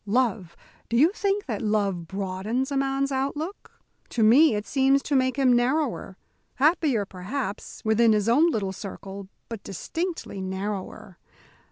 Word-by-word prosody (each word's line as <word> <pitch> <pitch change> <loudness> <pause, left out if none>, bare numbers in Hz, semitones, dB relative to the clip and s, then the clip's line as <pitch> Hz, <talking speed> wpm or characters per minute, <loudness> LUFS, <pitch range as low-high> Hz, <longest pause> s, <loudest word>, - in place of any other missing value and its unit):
Love 210 -6 0 0.3
do 235 - +1
you 310 +8 +5
think 405 0 -1
that 220 -7 -3
love 200 -5 0
broadens 200 - -2
a - - -1
man's 275 0 0
outlook? 290 +7 -3 0.4
To 230 - 0
me 255 +5 +6
it 210 0 -3
seems 270 0 +2
to 290 - -1
make 260 -1 +2
him 260 -3 +4
narrower 245 -5 0 0.4
happier, 280 - +2
perhaps, 195 +4 -5
within 220 +1 +4
his 210 -1 +2
own 295 +9 +5
little 195 - -2
circle 195 0 -8 0.2
but 225 -3 -7
distinctly 325 - -4
narrower. 190 0 -5
235 Hz, 145 wpm, -25 LUFS, 200-275 Hz, 0.4 s, me